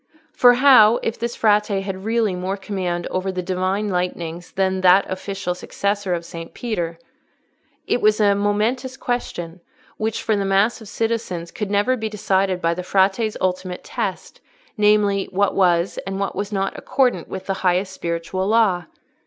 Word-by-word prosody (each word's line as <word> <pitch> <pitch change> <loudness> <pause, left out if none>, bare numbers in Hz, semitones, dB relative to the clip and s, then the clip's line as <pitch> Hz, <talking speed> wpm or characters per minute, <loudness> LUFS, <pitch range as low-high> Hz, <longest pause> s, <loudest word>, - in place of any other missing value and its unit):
For 245 -1 +6
how 245 -4 +7
if 225 - -2
this 235 +1 -3
Frate 210 -1 +3
had 195 -1 -3
really 225 -3 +1
more 185 +2 -3
command 185 -3 -3
over 185 +1 -1
the 185 -1 -4
Divine 185 +3 -1
lightnings 175 -2 -3
than 190 -1 0
that 185 +1 +5
official 190 -1 -4
successor 200 +1 -2
of 170 0 -6
Saint 165 0 -9
Peter? 175 -9 -3 0.9
It 245 - 0
was 215 0 +3
a 205 -1 +4
momentous 215 +6 -1
question, 180 -10 -4 0.4
which 220 0 -2
for 220 - +1
the 200 - 0
mass 195 +5 +2
of 220 - -11
citizens 220 -6 -3
could 210 -2 -4
never 205 +5 +2
be 220 -3 -3
decided 190 -3 0
by 165 0 +2
the 180 - -4
Frate's 195 +4 +1
ultimate 185 -1 -2
test, - - -5 0.3
namely, 210 -2 +3
what 200 +1 0
was 175 -2 +2
and 195 0 -3
what 200 - -2
was 205 +1 -3
not 195 -1 -1
accordant 250 -11 +1
with 190 0 -7
the 195 - -1
highest 185 +1 +1
spiritual 170 +2 -3
law. 205 -6 +2
195 Hz, 165 wpm, -21 LUFS, 180-215 Hz, 0.9 s, how